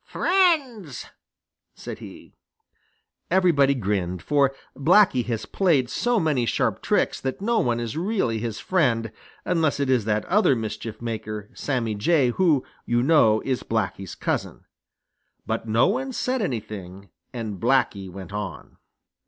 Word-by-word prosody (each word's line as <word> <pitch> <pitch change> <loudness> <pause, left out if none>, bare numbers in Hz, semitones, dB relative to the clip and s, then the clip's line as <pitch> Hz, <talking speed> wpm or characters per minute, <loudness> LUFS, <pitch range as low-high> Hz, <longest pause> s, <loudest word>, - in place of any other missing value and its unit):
"Friends," 285 - +1 0.7
said - - -8
he. - - -12 1.0
Everybody 165 -7 +4
grinned, 95 -6 -2
for 140 -2 +3 0.2
Blacky 140 -1 +4
has 115 -3 -2
played 150 -10 +1
so 240 - +1
many 145 -8 +1
sharp - - 0
tricks - - 0
that 130 -1 -3
no 230 +3 +1
one 120 -1 +1
is 115 -2 -4
really 165 - 0
his 110 -2 -4
friend 120 - +1 0.3
unless 160 -5 +1
it 140 -2 +1
is 120 -5 +2
that 105 -1 0
other 195 -8 +3
mischief 110 0 -5
maker, 105 -2 -5
Sammy 120 -6 -2
Jay, 130 +5 +2
who, 155 -3 +2 0.2
you 120 0 +2
know, 125 -8 +4
is 130 -2 -1
Blacky's 105 -4 -3
cousin. - - -3 0.8
But - - -3
no 115 +3 +3
one 260 +6 -1
said 255 +1 -1
anything, 100 - -5 0.2
and 110 -6 -5
Blacky 110 -5 +1
went 95 +2 -9
on. 105 0 -6
125 Hz, 135 wpm, -24 LUFS, 110-170 Hz, 1.0 s, Everybody